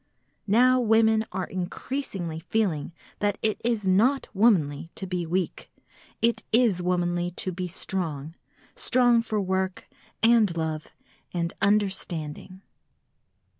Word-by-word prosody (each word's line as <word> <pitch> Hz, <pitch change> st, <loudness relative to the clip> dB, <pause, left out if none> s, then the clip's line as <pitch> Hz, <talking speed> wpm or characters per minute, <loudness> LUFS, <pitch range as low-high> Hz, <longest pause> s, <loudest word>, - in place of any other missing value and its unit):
Now 250 Hz, +5 st, +5 dB
women 220 Hz, -1 st, +3 dB
are 185 Hz, -1 st, -2 dB
increasingly 185 Hz, -, -4 dB
feeling 180 Hz, -4 st, -1 dB, 0.3 s
that 205 Hz, -1 st, 0 dB
it 215 Hz, -1 st, 0 dB
is 230 Hz, -3 st, 0 dB
not 225 Hz, +9 st, +3 dB
womanly 170 Hz, -9 st, +2 dB
to 190 Hz, -, -5 dB
be 180 Hz, -2 st, -3 dB
weak, 180 Hz, +1 st, -2 dB, 0.5 s
it 235 Hz, 0 st, +2 dB
is 225 Hz, -6 st, +3 dB
womanly 175 Hz, -1 st, 0 dB
to 185 Hz, +1 st, -3 dB
be 180 Hz, +1 st, -4 dB
strong, 165 Hz, -4 st, -4 dB, 0.4 s
strong 245 Hz, -2 st, +4 dB
for 220 Hz, -2 st, -2 dB
work 190 Hz, -1 st, -2 dB, 0.4 s
and 225 Hz, -6 st, +4 dB
love 160 Hz, -1 st, -2 dB, 0.5 s
and 170 Hz, -1 st, -1 dB
understanding. 190 Hz, -3 st, -1 dB
190 Hz, 115 wpm, -26 LUFS, 175-220 Hz, 0.5 s, Now